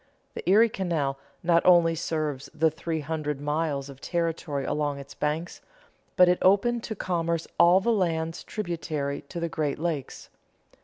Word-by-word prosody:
The - - -4
Erie 220 +4 +6
Canal 160 -9 -2 0.2
not 170 -1 +3
only 170 -2 +5
serves 155 -4 -3
the 160 0 +3
three 160 0 -3
hundred 150 -1 -3
miles 145 -1 -1
of 135 -1 -12
territory 165 -5 -2
along 145 -1 -1
its 140 0 -10
banks, 150 +5 -3 0.5
but 180 - +7
it 180 0 +3
opened 225 +5 +3
to 220 - -4
commerce 170 -3 -1
all 175 +2 +7
the 230 +4 +1
lands 165 -4 -1
tributary 160 -7 -3
to 175 - -5
the 170 - -1
Great 155 -4 -2
Lakes. 155 -4 -4
165 Hz, 155 wpm, -27 LUFS, 150-175 Hz, 0.5 s, but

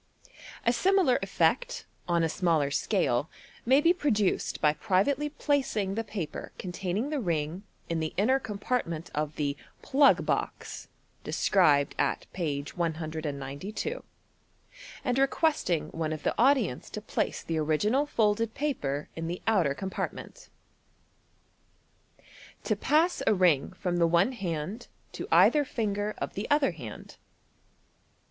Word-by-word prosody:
A 235 - +4
similar 370 -4 +3
effect, - - 0 0.2
on 170 -1 +2
a - - +3
smaller 160 -5 +1
scale, 145 - +1 0.4
may 265 +3 +6
be 330 +4 +4
produced 215 - 0
by 150 -1 +4
privately 225 - +1
placing 265 -10 0
the 225 +3 -2
paper 200 -7 -5
containing 190 +8 -3
the 300 - 0
ring 165 - -2 0.3
in 165 -1 -1
the 160 0 -2
inner 255 +7 +3
compirtment 200 -7 -3
of 150 0 -2
the 145 -2 -1
" - - -34
plug 280 +1 +4
box - - -3 0.2
" - - -38
(described 145 -8 +3
at - - 0
page 145 -5 -3
192), 160 - -4 1.0
and 250 0 +1
requesting 270 - +1
one 160 -1 -3
of 155 -2 -5
the - - +1
audience 245 - +2
to - - -5
place 210 - -2
the 165 -1 -2
original 210 - +1
folded 225 -3 +1
paper 150 - -2
in 165 0 -4
the 175 +2 -3
outer 180 -11 +2
compart. 190 +2 -3
ment. - - -11 2.1
To - - +1
Pass 325 +4 +2
a 215 - +5
Ring 180 -4 +3
from 180 -2 -2
the 170 -1 +4
one 175 +8 +3
Hand 190 0 -4 0.2
to - - -6
either 300 -1 +6
Finger 210 -5 -2
op - - -4
the 200 - -4
other 290 -7 +3
Hand. 125 -11 -10
190 Hz, 135 wpm, -28 LUFS, 160-255 Hz, 2.1 s, may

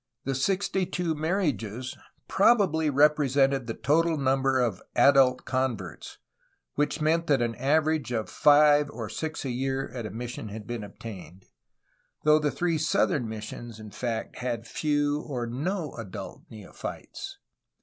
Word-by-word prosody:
The 135 - -1
sixty 190 +6 0
two 175 -2 -1
marriages 145 - -2 0.3
probably 190 -8 +3
represented 140 -2 +3
the 115 - -3
total 160 +3 +2
number 135 -1 +2
of 115 -7 0
adult 130 0 +5
converts, 120 - -3 0.6
which 150 +2 0
meant 165 +2 +2
that 140 -3 +3
an 120 -1 0
average 150 +2 +1
of 110 -2 -1
five 145 0 +5
or 115 -6 -6
six 155 -2 -4
a 130 - -1
year 135 +2 -2
at 120 -3 -5
a - - -7
mission 115 +1 -6
had 105 +1 -8
been 120 -1 -5
obtained, 100 -4 -10 0.8
though 150 0 +5
the 150 -1 +1
three 170 0 0
southern 155 - +1
missions 110 +1 -7
in 110 -1 -10
fact 115 +2 -4
had 120 -2 -3
few 145 +1 0
or 125 -4 -4
no 150 +7 -3
adult 100 -3 -8
neophytes. 105 -4 -8
135 Hz, 140 wpm, -27 LUFS, 115-150 Hz, 0.8 s, adult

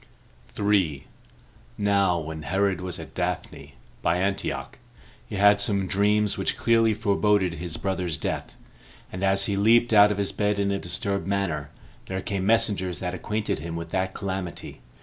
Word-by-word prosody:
3. 95 -9 +1 0.7
Now 100 -3 +2
when 80 -1 -5
Herod 95 +5 0
was 90 -1 -4
at - - -10
Daphne, - - -4 0.3
by 85 - +2
Antioch, 100 +2 -2 0.5
he - - -6
had 100 +1 +5
some 100 -2 +1
dreams 105 +2 +1
which - - -1
clearly 115 -2 +3
foreboded 105 -3 +2
his 85 0 -5
brother's 90 -5 -2
death; - - -4 0.6
and 90 +1 -5
as 100 0 +3
he 100 - -1
leaped 115 +3 +4
out 105 0 +7
of 105 - -2
his 100 -1 -1
bed 105 0 0
in 100 0 +1
a 100 - -1
disturbed 95 +2 -2
manner, 85 -7 -1 0.4
there 95 0 -3
came 95 0 -3
messengers 100 -5 +2
that 90 -1 -4
acquainted 105 +4 -2
him 85 0 -5
with 85 0 -5
that 95 +1 -2
calamity. 95 -3 -5
100 Hz, 160 wpm, -25 LUFS, 90-105 Hz, 0.7 s, out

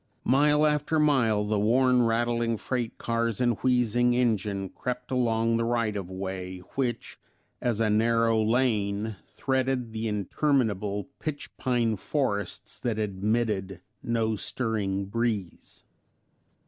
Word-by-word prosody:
Mile 150 +3 +4
after 150 +1 +1
mile 130 -9 +3
the 105 0 0
worn, 125 +4 +4
rattling 115 0 +1
freight 120 0 -3
cars 115 -1 -1
and 120 -3 +1
wheezing 120 -1 +2
engine 105 -5 0
crept 125 +4 -5
along 115 -2 +2
the 115 - 0
right 115 -2 0
of 95 -3 -4
way, 95 -1 -5 0.2
which, 125 -4 -3 0.4
as 120 -3 0
a 115 - +2
narrow 115 +1 +3
lane, 110 -3 0
threaded 130 -3 -1
the 110 0 -2
interminable 105 -2 0
pitch 145 -3 -5
pine 120 -4 +1
forests 105 -3 -2
that 115 -3 -2
admitted 105 -2 -1 0.2
no 115 -2 0
stirring 105 -3 -1
breeze. 105 -3 -3
115 Hz, 120 wpm, -27 LUFS, 105-125 Hz, 0.4 s, Mile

